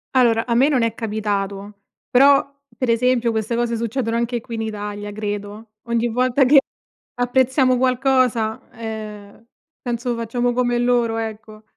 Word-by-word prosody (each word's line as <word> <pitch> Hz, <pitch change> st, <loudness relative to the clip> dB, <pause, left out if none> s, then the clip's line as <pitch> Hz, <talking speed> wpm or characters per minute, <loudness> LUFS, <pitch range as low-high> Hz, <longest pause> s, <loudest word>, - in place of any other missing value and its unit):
Allora, 230 Hz, -3 st, +3 dB
a 235 Hz, -1 st, 0 dB
me 265 Hz, +4 st, +5 dB
non 265 Hz, -5 st, +2 dB
è 230 Hz, -1 st, 0 dB
capitato, 205 Hz, -2 st, -4 dB, 0.3 s
però 275 Hz, +2 st, +5 dB, 0.3 s
per 255 Hz, 0 st, -1 dB
esempio 235 Hz, 0 st, +2 dB
queste 220 Hz, +1 st, -2 dB
cose 235 Hz, -1 st, -1 dB
succedono 230 Hz, 0 st, -2 dB
anche 235 Hz, 0 st, -1 dB
qui 230 Hz, +1 st, -7 dB
in 225 Hz, -, -3 dB
Italia, 205 Hz, -1 st, -5 dB
credo. 205 Hz, +1 st, -6 dB
Ogni 235 Hz, 0 st, 0 dB
volta 255 Hz, +3 st, +2 dB
che 275 Hz, +2 st, +7 dB, 0.6 s
apprezziamo 255 Hz, +1 st, +2 dB
qualcosa, 255 Hz, -3 st, +1 dB
ehm, 215 Hz, -2 st, -8 dB, 0.4 s
penso 240 Hz, 0 st, -2 dB
facciamo 240 Hz, +1 st, -1 dB
come 245 Hz, 0 st, +1 dB
loro, 240 Hz, -2 st, +1 dB
ecco. 215 Hz, -1 st, -7 dB
230 Hz, 145 wpm, -21 LUFS, 220-250 Hz, 0.6 s, che